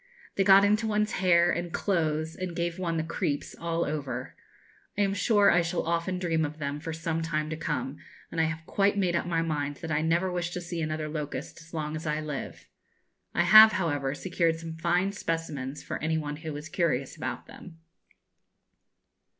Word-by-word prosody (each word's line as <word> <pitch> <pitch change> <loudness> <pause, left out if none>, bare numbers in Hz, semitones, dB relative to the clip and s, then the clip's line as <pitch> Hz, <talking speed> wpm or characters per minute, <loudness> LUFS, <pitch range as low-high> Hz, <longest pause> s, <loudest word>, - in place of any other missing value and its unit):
They 195 - +3
got 195 +1 +7
into 215 +2 +2
one's 210 0 +1
hair 175 -2 +4
and 175 0 -2
clothes, 160 -5 0
and 185 -2 -5
gave 170 +1 -2
one 170 -3 -1
the 160 - 0
creeps 150 -3 -2
all 170 0 -1
over. 145 -2 -4 0.6
I - - +2
am 195 -1 +2
sure 205 +1 +4
I 175 - +4
shall 170 +1 -1
often 170 +2 -1
dream 165 -3 0
of 150 0 -3
them 145 -1 -3
for 160 +2 -5
some 160 0 -2
time 155 -1 -2
to - - -1
come, 145 -4 -3 0.3
and 165 - 0
I - - +3
have 160 0 -4
quite 200 +3 +1
made 180 -3 +1
up 170 - -1
my 165 -1 +1
mind 145 -3 -2
that 165 +1 -7
I 150 0 +1
never 170 +4 +1
wish 175 -1 -2
to - - -3
see 170 -1 -4
another 155 0 -2
locust 150 -1 -5
as 165 0 -16
long 155 -1 -3
as 155 0 -5
I 150 0 0
live. 150 -3 -6 0.7
I 175 - +4
have, 215 +4 +9
however, 145 -6 -1
secured 170 -1 0
some 165 0 -7
fine 175 +4 +1
specimens 155 -7 -4
for - - -5
any 160 +1 0
one 150 -1 -4
who 160 -1 -6
is 150 +2 -6
curious 155 -6 -1
about - - -5
them. 170 -3 -12
165 Hz, 200 wpm, -28 LUFS, 155-175 Hz, 0.7 s, have